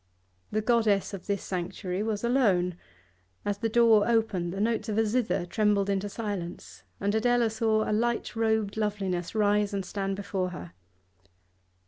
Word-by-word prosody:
The 215 0 0
goddess 215 -4 +2
of 195 - -7
this 200 -2 -1
sanctuary 185 +1 -3
was 215 -1 -2
alone; 200 -8 +2 0.7
as 205 0 -1
the 225 +1 0
door 225 -2 +5
opened 215 -7 +1
the 195 - -5
notes 225 +1 0
of 210 - -1
a 225 - +3
zither 215 -5 0
trembled 200 +1 +1
into 200 +1 -1
silence, 200 -5 -5 0.2
and 200 +1 0
Adela 235 0 +2
saw 220 -1 +1
a - - 0
light 235 +2 0
robed 220 -2 0
loveliness 195 -4 -2
rise 205 -1 +2
and 195 -1 -2
stand 195 0 -2
before 190 -2 -2
her. 85 - -9
210 Hz, 155 wpm, -28 LUFS, 195-220 Hz, 0.7 s, door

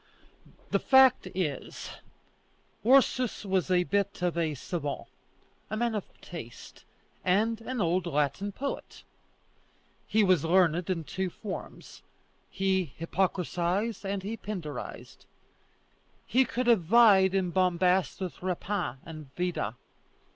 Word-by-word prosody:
The - - +3
fact 265 -6 +5
is, 155 -8 -3 0.9
Ursus 255 -2 +3
was 190 -1 0
a 180 -1 +3
bit 200 -1 -1
of 175 -2 +1
a 160 -3 0
savant, 145 +1 -4 0.6
a 215 - -3
man 235 0 0
of 210 -3 -2 0.2
taste, 120 -10 -10 0.4
and 220 +5 +1
an 255 +2 -4
old 180 -1 +1
Latin 150 +6 0
poet. 275 +7 -6 1.0
He 215 +1 +3
was 185 -6 +3
learned 175 0 +3
in 170 -3 -1
two 190 +4 -3
forms; 195 +2 -8 0.5
he 190 -6 0
Hippocratized 185 +4 -1
and 195 -1 -3
he 220 +3 -4
Pindarized. 170 - -7 1.0
He 260 +3 +3
could 250 +2 -2
have 235 -5 +5
vied 195 0 +5
in 185 -2 +1
bombast 185 0 +2
with 185 -2 -5
Rapin 180 -4 -2
and 155 -4 -9
Vida. 175 - -2
185 Hz, 120 wpm, -29 LUFS, 170-210 Hz, 1.0 s, fact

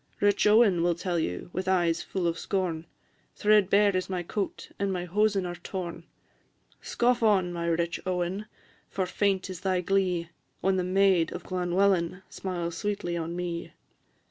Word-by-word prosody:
Rich 205 0 +3
Owen 210 -5 +5
will 175 0 +2
tell 175 0 -1
you, 90 - -3
with 185 +1 -3
eyes 175 -3 +2
full 185 -2 -3
of 170 0 0
scorn, 175 -4 -2 0.5
Threadbare 205 -1 +4
is 185 0 -1
my 180 -2 -2
coat, 195 +3 -4
and 200 -1 0
my 180 -1 -2
hosen 200 +1 +1
are 175 - -3
torn: 175 -1 -6 0.8
Scoff 240 0 +1
on, 190 -5 +3
my 170 -1 -3
rich 170 +1 0
Owen, 185 +3 -2 0.4
for 190 - -1
faint 195 +1 0
is 185 -2 -7
thy 185 -1 +1
glee 180 -2 0 0.3
When 190 0 +1
the 180 - +1
maid 185 -2 +3
of - - -8
Llanwellyn 180 0 +1
smiles 175 -3 -4
sweetly 205 -5 -2
on 165 0 -3
me. 175 -1 -4
185 Hz, 160 wpm, -28 LUFS, 175-195 Hz, 0.8 s, Owen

